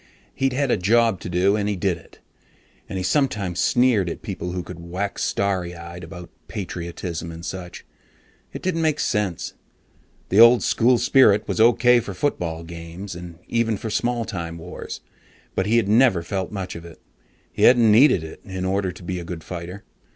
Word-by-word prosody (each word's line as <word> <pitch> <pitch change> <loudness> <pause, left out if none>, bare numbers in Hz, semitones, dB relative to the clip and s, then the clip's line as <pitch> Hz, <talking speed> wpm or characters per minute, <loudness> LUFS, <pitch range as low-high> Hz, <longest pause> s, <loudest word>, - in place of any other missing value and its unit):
He'd 135 -1 0
had 140 -1 0
a - - +3
job 115 +1 +3
to - - -7
do, 90 +3 +2
and 105 -1 -1
he 105 - -1
did 95 -1 0
it, 80 - -17 0.7
and 95 - -4
he 90 - -2
sometimes 95 - 0
sneered 120 -7 +3
at - - -7
people 90 - -5
who 90 0 -3
could 90 -1 -9
wax 90 +4 -4
starry 95 -3 -1
eyed 85 +1 -9
about 85 +1 -10 0.2
patriotism 85 -4 -5
and 85 +1 -9
such. 90 -2 -7 0.7
It - - -8
didn't 180 -3 0
make 155 -2 +1
sense. 105 -6 -1 0.8
The 100 - +3
old 115 +1 +8
school 120 +2 +3
spirit 110 -5 +4
was - - 0
okay 120 +1 +5
for 100 -4 -6
football 85 - -2
games, 85 +3 -8
and 85 -1 -9
even 115 -2 0
for 110 +2 -5
small 120 +1 0
time 85 -4 -5
wars, 85 +2 -8 0.5
but 95 - -1
he 115 +2 +3
had 115 -4 +2
never 110 -5 +4
felt 95 +1 -3
much 95 -3 -5
of 85 - -8
it. 85 -1 -13 0.5
He - - -5
hadn't 120 -3 +6
needed 110 - +5
it 80 - -10
in 95 -1 -5
order 95 0 0
to 90 - -13
be 90 +1 -3
a - - -6
good 85 -1 -7
fighter. 90 +3 -7
95 Hz, 190 wpm, -23 LUFS, 85-115 Hz, 0.8 s, old